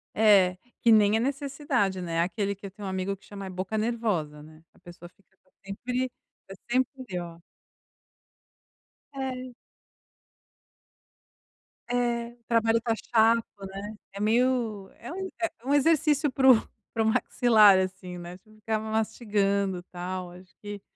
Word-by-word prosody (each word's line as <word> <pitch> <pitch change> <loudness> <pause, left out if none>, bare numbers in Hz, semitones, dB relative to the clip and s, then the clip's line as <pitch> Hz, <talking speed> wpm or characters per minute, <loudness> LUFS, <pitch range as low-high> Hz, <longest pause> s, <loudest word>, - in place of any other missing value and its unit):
É. 195 -4 +5 0.2
Que 230 - +5
nem 215 0 +5
é - - 0
necessidade, 270 -7 -1
né, 165 -2 -1
aquele 200 +3 -1
que 200 +1 -9
eu - - -11
tenho 200 +1 -9
um - - -3
amigo 190 +1 -2
que - - -22
chama 200 -1 -8
é - - -6
boca 185 +3 -4
nervosa, 210 -10 -1
né. 155 +1 -16
A - - -24
pessoa 175 0 -12
fica 190 +1 -34
tá 185 - -33 0.2
sempre 250 +6 -3 0.4
tá 195 - -9 0.2
sempre 255 -6 -1
ó. 170 -1 -8 1.7
É. 255 -2 -5 2.3
É. 240 -1 0 0.2
Trabalho 230 0 +3
tá 230 -1 0
chato, 230 +1 +3 0.2
né. 200 +3 -7 0.2
É 200 - -7
meio 225 -3 +1
é 240 - -9
um 380 +1 -4
é 335 - 0 0.2
um 275 - +1
exercício 295 0 +3
para 265 0 +6
o 245 - +8 0.4
para 225 - +1
o - - 0
maxilar, 220 -3 +5
assim 185 -1 -3
né, 175 +1 -8
tipo, 215 +3 -25
você 215 - -18
fica 220 0 0
lá 220 0 -5
mastigando, 200 -4 0
tal, 180 0 -5
acho 180 +1 -15
que 205 -1 -6
215 Hz, 155 wpm, -27 LUFS, 190-240 Hz, 2.3 s, o